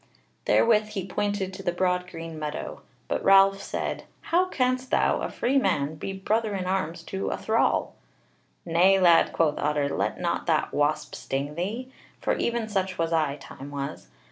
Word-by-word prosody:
Therewith 215 -2 +4
he 195 -4 -3
pointed 200 -1 -2
to 190 - -7
the 180 - 0
broad 180 0 0
green 165 -2 -7
meadow: 150 -1 -5 0.3
but - - -2
Ralph 195 0 +6
said: - - -4 0.2
"How 360 +2 +2
canst 255 -4 0
thou, - - +2
a - - -2
free 270 +3 +1
man, 155 - 0
be 160 +5 -5
brother 210 +2 -1
in 185 -1 -3
arms 185 -3 -2
to 190 +3 -3
a - - -2
thrall?" 220 +1 +1 0.7
"Nay, 180 +3 +4
lad," 170 -3 +5
quoth 155 -3 +1
Otter, 145 -1 0
"let - - -2
not - - -2
that - - +1
wasp 150 +1 0
sting 135 +4 -3
thee: 215 +10 -4 0.3
for - - 0
even 235 -1 -1
such 190 -3 -2
was 165 0 0
I, 155 -4 +1
time 140 0 -10
was. 140 -1 -5
185 Hz, 170 wpm, -26 LUFS, 155-205 Hz, 0.7 s, Ralph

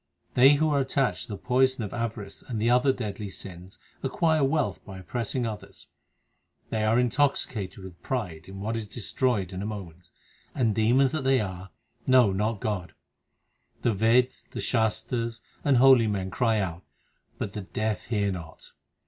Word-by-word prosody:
They 135 +3 +7
who 155 +1 +2
are 140 - +3
attached 130 -8 0
to - - -6
the - - -5
poison 130 +1 +2
of 105 - -5
avarice 115 -4 -4
and 115 -4 -5
the 115 +3 +2
other 125 +2 +4
deadly 105 -5 -5
sins 95 0 -10 0.2
acquire 155 +2 +1
wealth 135 - 0
by 95 -2 -9
oppressing 115 +7 -2
others. 110 -2 -8 0.8
They 110 -1 0
are 110 +2 +3
intoxicated 125 -6 0
with 90 -2 -11
pride 90 -11 -3
in 95 0 -8
what 110 +3 -2
is 110 -2 -4
destroyed 105 -3 -1
in 95 - -4
a - - -3
moment, 90 -5 -8 0.5
and, 115 -4 +2
demons 120 +5 +3
that 155 -2 -2
they 135 0 +4
are, 95 -2 -5 0.4
know 130 -5 +6
not 105 +2 -1
God. 100 -5 -3 0.9
The 115 - +3
Veds, 115 +5 +2
the - - -7
Shastars, 115 0 0 0.2
and 140 -3 +4
holy 130 -3 +7
men 95 -3 -2
cry 115 +2 +2
out, 85 -3 -3 0.6
but 100 - -4
the 105 - -4
deaf 110 +2 -3
hear 100 -3 0
not. 85 -3 -9
110 Hz, 165 wpm, -27 LUFS, 95-125 Hz, 0.9 s, They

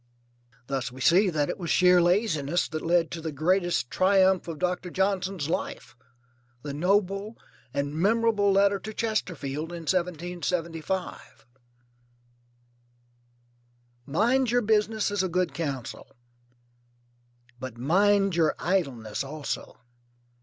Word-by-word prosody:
Thus 135 0 -3
we 130 - -12
see 185 +9 +4
that 150 -4 0
it - - -4
was 170 -3 -4
sheer 180 -1 +5
laziness 175 -4 +1
that 155 0 -4
led 170 0 +1
to 165 - -5
the 160 0 -4
greatest 170 -3 0
triumph 190 -1 +3
of 165 -2 -5
Doctor 180 +1 -2
Johnson's 190 -4 -1
life, 165 - -4 0.7
the 145 -1 -5
noble 195 +6 0 0.3
and 140 +1 -2
memorable 205 +3 +2
letter 200 0 +3
to 215 +2 -8
Chesterfield 165 - -3
in 170 -1 -6
1775. 175 0 -3 2.6
Mind 240 - +2
your 245 +1 +2
business 215 0 +1
is 205 -2 0
a 190 - -1
good 180 -3 0
counsel; 140 -5 -5 1.5
but 130 -3 -7
mind 195 +7 +3
your 160 -3 +2
idleness 135 - -1
also. 145 +1 -5
180 Hz, 115 wpm, -27 LUFS, 155-195 Hz, 2.6 s, sheer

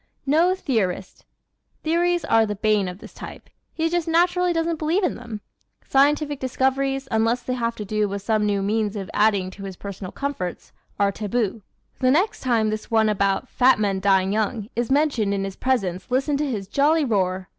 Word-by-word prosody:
No 330 +6 +3
Theorist 215 - -2 0.5
¶ - - -49
Theories 345 +1 +1
are 225 -5 +3
the 210 - -3
bane 210 -1 +1
of 180 0 -6
this - - -13
type. - - -10 0.2
He 325 0 -1
just 345 0 -1
naturally 350 +2 +2
doesn't 330 -1 -1
believe 330 +6 +1
in 360 - +1
them. 230 -3 -8 0.5
Scientific 290 +1 +2
discoveries, 265 +1 0
unless 225 +2 +1
they 255 - -2
have 235 -2 -1
to 210 - -6
do 210 0 0
with 200 0 -5
some 215 0 +1
new 200 -1 0
means 210 +1 0
of 195 -3 -5
adding 205 -3 +2
to 195 +1 -11
his 195 -1 -6
personal 195 -1 -7
comforts, 275 -11 -4 0.3
are 200 -1 +3
taboo. 215 +1 -2 0.4
The 255 - +3
next 345 +11 +2
time 225 -4 +1
this 215 0 -5
one 220 -2 +3
about 200 +3 0
"fat 255 +1 +4
men 200 -2 0
dying 190 0 +2
young" 215 0 -1
is 240 -1 -1
mentioned 265 -8 +2
in 195 - -2
his 195 -1 -5
presence 195 -8 -1
listen 270 +3 +1
to 295 0 -1
his 205 -6 -4
jolly 295 +7 +2
roar. 185 -5 0
225 Hz, 190 wpm, -23 LUFS, 200-280 Hz, 0.5 s, fat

